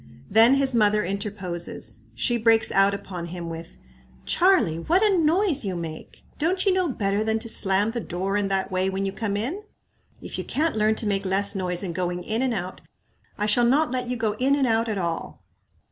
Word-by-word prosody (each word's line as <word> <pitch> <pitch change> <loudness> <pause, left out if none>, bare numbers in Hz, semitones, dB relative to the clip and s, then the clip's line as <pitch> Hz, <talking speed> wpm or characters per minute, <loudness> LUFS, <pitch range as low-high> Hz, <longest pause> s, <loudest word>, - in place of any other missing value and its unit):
Then 225 +5 +6
his 275 -1 +1
mother 210 -2 +3
interposes. 180 - -5 0.2
She 240 - +1
breaks 225 -1 +3
out 195 +1 +3
upon 180 -3 -7
him 170 -1 -6
with, 165 0 -9 0.5
"Charlie, 340 - +3
what 350 - +2
a 415 -3 +4
noise 335 -2 +2
you 190 -3 -3
make! 165 -2 -8 0.2
Don't 365 +6 0
you 390 - +4
know 365 -2 +1
better 205 -4 -1
than 220 0 0
to 220 - -7
slam 200 0 +3
the 235 - -3
doer 190 -1 -3
in 205 -1 +1
that 195 0 -1
way 185 +1 0
when 195 +1 -2
you 195 - -2
come 205 -1 -3
in? 275 - -3 0.6
If - - -7
you - - -3
can't 315 0 -1
learn 215 0 +2
to 220 - -3
make 200 -1 0
less 195 +1 +1
noise 180 -2 -1
in 175 -3 -4
going 180 0 -3
in 220 +6 -2
and 260 -1 +1
out, 185 -4 -5 0.6
I 210 - -1
shall 215 +3 +3
not 275 +5 +3
let 250 -1 -2
you 250 - -2
go 225 -2 0
in 270 +2 +3
and 280 -2 +1
out 230 -1 +1
at 210 - -2
all." 170 -3 -4
210 Hz, 210 wpm, -24 LUFS, 190-250 Hz, 0.6 s, Then